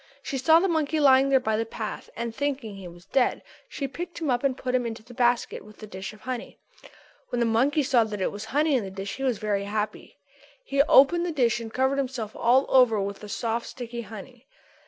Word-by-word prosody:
She 270 - -3
saw 320 +5 +6
the 385 - +1
monkey 315 -2 0
lying 270 -1 +5
there 270 -1 +5
by 220 -4 0
the 225 - +1
path 225 -1 -6
and, 235 -1 -4
thinking 275 -4 -2
that 195 - -10
he 185 - -8
was 175 +1 -14
dead, 260 +4 +1 0.3
she 275 - -4
picked 345 +6 -7
him 310 -5 -1
up 245 +1 0
and 265 -2 +1
put 255 -1 -3
him 255 -1 +2
into 225 -1 -7
the 245 +2 -14
basket 240 0 +1
with 215 0 -16
the 215 - -9
dish 190 -1 -7
of 215 - -16
honey. 255 -2 -6 0.7
When 245 - -2
the 235 - +2
monkey 260 +7 +2
saw 255 -3 +4
that 210 -2 -5
it 190 - 0
was 205 +1 -7
honey 295 +6 +1
in 245 - +1
the 195 - -6
dish 195 +3 -6
he 270 - -5
was 255 -4 +1
very 205 -1 -1
happy. 210 +1 -4 0.5
He 275 -7 +2
opened 310 +4 +5
the - - -1
dish 240 -6 +1
and 225 -1 -7
covered 265 +3 +1
himself 250 -5 -4
all 250 +3 +3
over 250 -5 +5
with 200 0 -3
the 210 - -10
soft 230 +2 -2
sticky 240 -1 -6
honey. 230 +4 -11
245 Hz, 240 wpm, -26 LUFS, 215-270 Hz, 0.7 s, saw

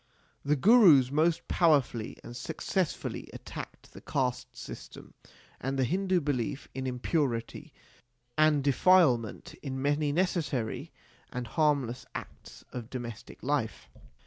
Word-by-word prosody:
The 145 +1 +2
Gurus 165 - +7
most 160 +3 +2
powerfully 140 -9 +2
and 120 - -9
successfully 160 +6 -3
at - - -10
tacked - - -9
the - - -11
caste 125 -2 -2
system - - -10 0.5
and 135 +1 -2
the 135 - +2
Hindu 185 +5 +1
belief 140 -2 -2
in 130 0 -3
impurity 130 +2 -2 0.6
and 155 -2 +4
defilement 140 - +3
in 135 -2 -4
many 145 +2 +1
necessary 150 -9 -1 0.4
and 125 -1 -4
harmless 140 -4 0
acts - - -9
of 120 -3 -6
domestic 120 -4 -7
life. - - -1
140 Hz, 120 wpm, -30 LUFS, 125-155 Hz, 0.6 s, Gurus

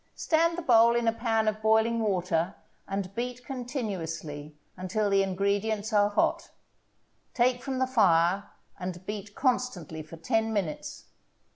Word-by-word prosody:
Stand 335 +1 +2
the 350 - -4
bowl 235 -3 +5
in 235 -1 +1
a 225 - +3
pan 225 -1 0
of 215 0 0
boiling 220 +1 +3
water 185 -4 0 0.3
and 195 -1 -3
beat 245 +2 -4
continuously 170 - -5 0.2
until 200 +3 -1
the 195 0 +4
ingredients 200 +3 -1
are 205 -1 +4
hot; 205 - 0 0.9
take 245 0 +2
from 265 0 -3
the 260 - +2
fire 195 -6 +3 0.3
and 180 0 -6
beat 205 0 -6
constantly 240 - -1
for 155 +2 -11
ten 225 +4 0
minutes. 195 -8 -3
215 Hz, 140 wpm, -28 LUFS, 185-235 Hz, 0.9 s, bowl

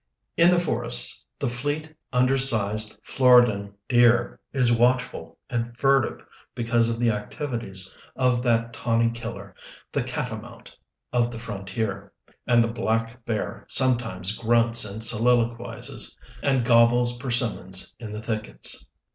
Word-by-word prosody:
In 170 +1 +5
the 180 -1 +4
forests 65 - +2
the - - -2
fleet, 145 +6 -3 0.2
under 125 +1 +2
sized 110 -5 +2
Floridan 120 -6 +3
deer 120 -1 +3
is 125 -3 +1
watchful 125 +2 0
and 120 -1 -4
furtive 135 -2 +1 0.3
because 115 -1 +2
of 115 0 -3
the 120 -1 +2
activities 105 -4 -3 0.2
of 125 -2 +1
that 115 -1 0
tawny 115 0 +1
killer, 115 -4 -8 0.4
the - - -1
"catamount" - - -6 0.4
of 120 -1 +2
the 120 - -8
frontier; 100 -2 -5 0.4
and 120 -1 +4
the - - 0
black 115 +1 -2
bear 110 -3 -4
sometimes 120 -7 +1
grunts 115 0 +2
and 105 +2 -6
soliloquizes 120 +1 0 0.2
and 135 -4 +1
gobbles 120 +1 +4
persimmons 120 -7 0
in 110 -3 -8
the 105 +1 -7
thickets. 110 -1 -2
115 Hz, 125 wpm, -24 LUFS, 110-125 Hz, 0.4 s, In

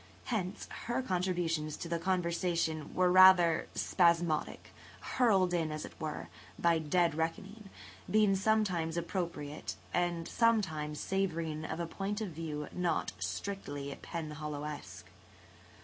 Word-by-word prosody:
Hence, 205 -5 -3 0.2
her 245 +2 0
contributions 175 -6 -1
to - - -5
the 170 0 -1
conversation 170 -3 0
were 180 -1 +4
rather 185 -3 +7
spasmodic, 170 -3 +1 0.3
hurled 195 -8 +2
in, 165 -3 0
as 155 0 -4
it - - -10
were, 150 - -4 0.3
by 170 -1 +3
dead 165 +2 +2
reckoning, 195 +6 -4 0.4
being 210 -2 +4
sometimes 190 -5 +1
appropriate 170 -4 -3 0.2
and 175 -1 0
sometimes 160 -11 +1
savouring 165 -5 -1
of 160 - -4
a 170 - -1
point 195 +5 -3
of 215 -3 -3
view 155 -2 -5
not 180 -2 0
strictly 140 - -4
Penhallowesque. 150 -2 -6
170 Hz, 115 wpm, -32 LUFS, 155-190 Hz, 0.4 s, rather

